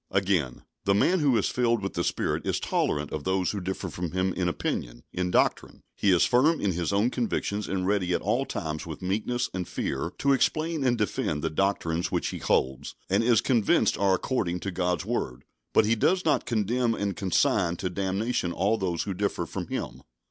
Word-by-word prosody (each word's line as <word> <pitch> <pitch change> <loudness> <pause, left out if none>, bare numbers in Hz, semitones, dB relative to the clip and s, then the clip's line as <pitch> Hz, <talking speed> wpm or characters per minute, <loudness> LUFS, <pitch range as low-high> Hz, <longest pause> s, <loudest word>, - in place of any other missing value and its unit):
Again, 90 -10 0 0.2
the 100 - +3
man 180 - +3
who 140 -6 +3
is - - +1
filled 120 -4 +1
with 95 - -3
the 85 - -1
Spirit - - -1
is - - -1
tolerant 75 0 -1
of 75 - -4
those 95 0 +1
who 100 - -4
differ 95 +1 -4
from 90 -2 -5
him 95 0 0
in 90 - -1
opinion, - - -3
in 90 0 -1
doctrine. - - 0
He 100 - +1
is 90 -3 +5
firm 145 +7 +3
in 100 - +1
his 85 0 -1
own 105 +5 +2
convictions, 105 -4 -2
and 95 -1 -1
ready 95 -2 +1
at - - -1
all 120 +7 +1
times 80 0 -4
with 80 +2 -7
meekness 115 +6 -1
and 90 -1 -3
fear - - -3
to 140 0 +3
explain 155 +3 +1
and 125 -2 +2
defend 90 -8 -1
the 80 - 0
doctrines 85 -1 0
which - - 0
he - - -5
holds 65 +2 0 0.2
and 100 +4 +3
is 115 -2 +4
convinced 120 -6 +3
are 95 -1 +3
according 90 -4 -1
to 95 - -3
God's 90 -2 -1
word, 65 +1 -3 0.3
but 110 - +4
he 110 - +3
does 180 - +2
not 150 -5 +2
condemn 115 +1 +1
and 100 -3 -2
consign 90 -2 +1
to 90 - -3
damnation 95 +1 -1
all 100 +6 +1
those 90 -4 -1
who 100 - -3
differ 100 +2 -1
from - - -5
him. - - -5
95 Hz, 205 wpm, -27 LUFS, 90-115 Hz, 0.3 s, is